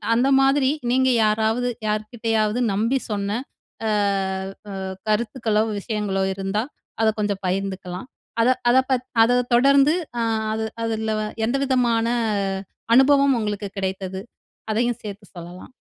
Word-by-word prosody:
அந்த 250 Hz, +4 st, +3 dB
மாதிரி 270 Hz, 0 st, +3 dB, 0.2 s
நீங்க 260 Hz, +1 st, +3 dB, 0.2 s
யாராவது 220 Hz, +3 st, +1 dB, 0.2 s
யார்க்கிட்டயாவது 215 Hz, +1 st, -1 dB
நம்பி 230 Hz, +7 st, +1 dB
சொன்ன 205 Hz, +2 st, -1 dB, 0.5 s
அ -, -, +1 dB, 0.8 s
அ -, -, -6 dB, 0.4 s
கருத்துக்களோ, 215 Hz, 0 st, +1 dB, 0.2 s
விஷயங்களோ 200 Hz, -2 st, -2 dB
இருந்தா, 195 Hz, +2 st, -2 dB, 0.4 s
அத 225 Hz, -, +4 dB
கொஞ்சம் 205 Hz, -2 st, -1 dB
பகிர்ந்துக்கலாம். 190 Hz, 0 st, -3 dB, 0.3 s
அத 235 Hz, -, +4 dB, 0.2 s
அத 245 Hz, -, +5 dB
பத் 255 Hz, -1 st, +1 dB, 0.2 s
அத 245 Hz, +2 st, +3 dB, 0.2 s
தொடர்ந்து 275 Hz, +4 st, +5 dB, 0.3 s
அ -, -, +1 dB, 0.3 s
அது 220 Hz, 0 st, -2 dB, 0.2 s
அதுலவ 220 Hz, -1 st, -1 dB, 0.3 s
எந்த 240 Hz, -, 0 dB
விதமான 240 Hz, -4 st, +2 dB, 0.9 s
அனுபவம் 275 Hz, 0 st, +5 dB
உங்களுக்கு 205 Hz, -2 st, -3 dB
கிடைத்தது? 190 Hz, 0 st, -3 dB, 0.5 s
அதையும் 235 Hz, +2 st, 0 dB
சேர்த்து 205 Hz, -1 st, -8 dB
சொல்லலாம். 175 Hz, +4 st, -10 dB
220 Hz, 115 wpm, -22 LUFS, 200-245 Hz, 0.9 s, அத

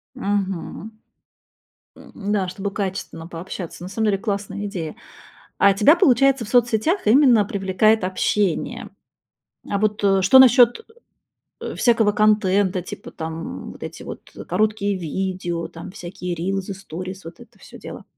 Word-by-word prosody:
Мгм. 200 Hz, -2 st, -3 dB, 1.0 s
М, -, -, -15 dB, 0.2 s
да, 195 Hz, -3 st, 0 dB
чтобы 195 Hz, +2 st, -4 dB
качественно 190 Hz, -5 st, -5 dB
пообщаться. 175 Hz, 0 st, -7 dB
На 180 Hz, -, -6 dB
самом 220 Hz, +3 st, -1 dB
деле 200 Hz, -2 st, +2 dB
классная 200 Hz, 0 st, -4 dB
идея. 170 Hz, -6 st, -5 dB, 0.6 s
А 200 Hz, -, +6 dB
тебя, 285 Hz, -, +5 dB
получается, 270 Hz, -, +3 dB
в -, -, -10 dB
соцсетях 240 Hz, -, +1 dB
именно 240 Hz, -2 st, +5 dB
привлекает 200 Hz, +2 st, +1 dB
общение? 185 Hz, -1 st, -1 dB, 0.8 s
А 200 Hz, -, -1 dB
вот, 210 Hz, 0 st, 0 dB
э, 195 Hz, -1 st, +3 dB
что 195 Hz, +8 st, +7 dB
насчет 245 Hz, -, +6 dB
э 450 Hz, -, -21 dB, 0.7 s
э, -, -, -5 dB
всякого 225 Hz, -4 st, +3 dB
контента, 205 Hz, -3 st, +2 dB
типа 185 Hz, -, -9 dB
там 160 Hz, +1 st, -6 dB
вот -, -, -15 dB
эти -, -, -7 dB
вот -, -, -9 dB, 0.2 s
короткие 210 Hz, -2 st, 0 dB
видео, 175 Hz, 0 st, -3 dB
там, -, -, -10 dB
всякие 180 Hz, -1 st, -6 dB
рилсы, 195 Hz, +3 st, -3 dB
сторис, 185 Hz, 0 st, -8 dB
вот 170 Hz, +9 st, -11 dB
это 240 Hz, -, -17 dB
всё -, -, -14 dB
дело? -, -, -9 dB
200 Hz, 140 wpm, -22 LUFS, 185-220 Hz, 1.0 s, что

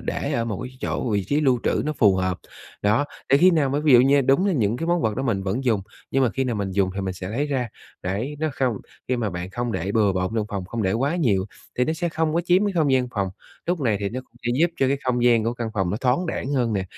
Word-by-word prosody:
để -, -, -3 dB
ở 115 Hz, -, 0 dB
một 110 Hz, -4 st, -3 dB
cái 130 Hz, 0 st, -8 dB
chỗ 120 Hz, -, -2 dB
vị 100 Hz, -3 st, 0 dB
trí 145 Hz, +1 st, +1 dB
lưu 130 Hz, -5 st, +2 dB
trữ -, -, +1 dB
nó 155 Hz, -, -1 dB
phù 105 Hz, -9 st, +4 dB
hợp. 95 Hz, -1 st, -1 dB, 0.4 s
Đó, 105 Hz, +7 st, +3 dB, 0.3 s
để 140 Hz, -, +7 dB
khi 180 Hz, +5 st, +6 dB
nào 155 Hz, -6 st, +2 dB
mà 140 Hz, -, 0 dB
ví 150 Hz, -2 st, +3 dB
dụ 120 Hz, -, +9 dB
như 140 Hz, +2 st, +4 dB
đúng 135 Hz, +8 st, +3 dB
là 200 Hz, -, +2 dB
những 115 Hz, -, +1 dB
cái 165 Hz, -, -3 dB
món 175 Hz, 0 st, +1 dB
vật 110 Hz, -2 st, 0 dB
đó 130 Hz, -, -1 dB
mình 110 Hz, -7 st, 0 dB
vẫn 100 Hz, +8 st, -2 dB
dùng, 115 Hz, -5 st, +2 dB, 0.3 s
nhưng 135 Hz, -, +2 dB
mà 120 Hz, -, +2 dB
khi 135 Hz, +4 st, -1 dB
nào 120 Hz, -3 st, -1 dB
mình 100 Hz, -2 st, -2 dB
dùng 95 Hz, 0 st, +1 dB
thì 100 Hz, -, -2 dB
mình 95 Hz, -1 st, -3 dB
sẽ 90 Hz, 0 st, -6 dB
lấy 130 Hz, +8 st, -1 dB
ra. 130 Hz, -4 st, -1 dB, 0.3 s
Đấy, 110 Hz, +11 st, -3 dB
nó 155 Hz, +1 st, 0 dB
không 130 Hz, -5 st, 0 dB, 0.3 s
khi 130 Hz, -, +1 dB
mà 110 Hz, -4 st, -1 dB
bạn 90 Hz, +1 st, -5 dB
không 120 Hz, +2 st, -3 dB
để 95 Hz, +2 st, -2 dB
bừa 105 Hz, -3 st, +3 dB
bộn 95 Hz, +2 st, -1 dB
trong 110 Hz, -2 st, 0 dB
phòng, 100 Hz, -2 st, -4 dB
không 115 Hz, +5 st, -4 dB
để 95 Hz, -1 st, +1 dB
quá 140 Hz, -, 0 dB
nhiều 100 Hz, -, +1 dB, 0.3 s
thì 125 Hz, -, +4 dB
nó 155 Hz, -, 0 dB
sẽ 170 Hz, +2 st, -2 dB
không 160 Hz, -1 st, -1 dB
có 170 Hz, -, +3 dB
chiếm 180 Hz, +3 st, +4 dB
cái 205 Hz, -, 0 dB
không 155 Hz, -6 st, +2 dB
gian 130 Hz, -1 st, +2 dB
phòng. 100 Hz, -3 st, 0 dB, 0.4 s
Lúc 175 Hz, -1 st, 0 dB
này 115 Hz, -7 st, +1 dB
thì 100 Hz, -, -1 dB
nó 125 Hz, +5 st, -4 dB
cũng 130 Hz, -, -24 dB
sẽ -, -, +2 dB
giúp 170 Hz, +1 st, +4 dB
cho 135 Hz, -, +2 dB
cái 140 Hz, -, +2 dB
không 125 Hz, -1 st, +1 dB
gian 115 Hz, -3 st, +4 dB
của 115 Hz, +1 st, -1 dB
căn 120 Hz, -2 st, -3 dB
phòng 95 Hz, -3 st, 0 dB
nó 100 Hz, -, -1 dB
thoáng 130 Hz, +8 st, +1 dB
đãng 140 Hz, -4 st, -3 dB
hơn 120 Hz, -5 st, +1 dB
nè, 95 Hz, -3 st, -1 dB
120 Hz, 305 wpm, -23 LUFS, 100-140 Hz, 0.4 s, dụ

